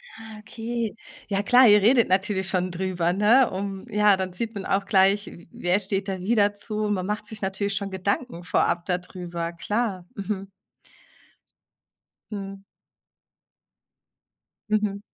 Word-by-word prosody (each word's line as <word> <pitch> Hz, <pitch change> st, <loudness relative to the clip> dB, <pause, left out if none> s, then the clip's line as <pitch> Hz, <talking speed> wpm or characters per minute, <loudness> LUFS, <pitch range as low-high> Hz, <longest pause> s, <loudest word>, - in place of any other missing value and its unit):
Ah, 220 Hz, -1 st, -10 dB
okay. 225 Hz, 0 st, -4 dB, 0.3 s
Ja 200 Hz, -1 st, 0 dB
klar, 245 Hz, +4 st, +6 dB
ihr 210 Hz, -1 st, +7 dB
redet 235 Hz, +3 st, +4 dB
natürlich 190 Hz, 0 st, +1 dB
schon 185 Hz, -1 st, 0 dB
drüber, 175 Hz, -1 st, -1 dB
ne, 225 Hz, +6 st, +5 dB
um 195 Hz, +2 st, -5 dB
ja, 210 Hz, -2 st, +4 dB
dann 185 Hz, -1 st, -3 dB
sieht 225 Hz, +5 st, -3 dB
man 200 Hz, -3 st, -6 dB
auch 195 Hz, 0 st, 0 dB
gleich, 195 Hz, +1 st, +3 dB
w 170 Hz, -, -12 dB
wer 180 Hz, +3 st, 0 dB
steht 195 Hz, 0 st, -2 dB
da 190 Hz, -1 st, -3 dB
wie 200 Hz, +6 st, 0 dB
dazu? 210 Hz, +1 st, 0 dB
Man 190 Hz, -3 st, -1 dB
macht 210 Hz, +2 st, -3 dB
sich 215 Hz, 0 st, -6 dB
natürlich 195 Hz, +1 st, -2 dB
schon 195 Hz, 0 st, -3 dB
Gedanken 190 Hz, +1 st, -2 dB
vorab 175 Hz, -1 st, +1 dB
da 180 Hz, -2 st, 0 dB
drüber, 175 Hz, -2 st, -6 dB
klar, 200 Hz, +1 st, -2 dB
mhm. 195 Hz, -1 st, -4 dB, 1.8 s
Mhm. 195 Hz, -1 st, -6 dB, 2.1 s
Mhm. 210 Hz, -2 st, 0 dB
200 Hz, 145 wpm, -25 LUFS, 190-210 Hz, 2.1 s, ihr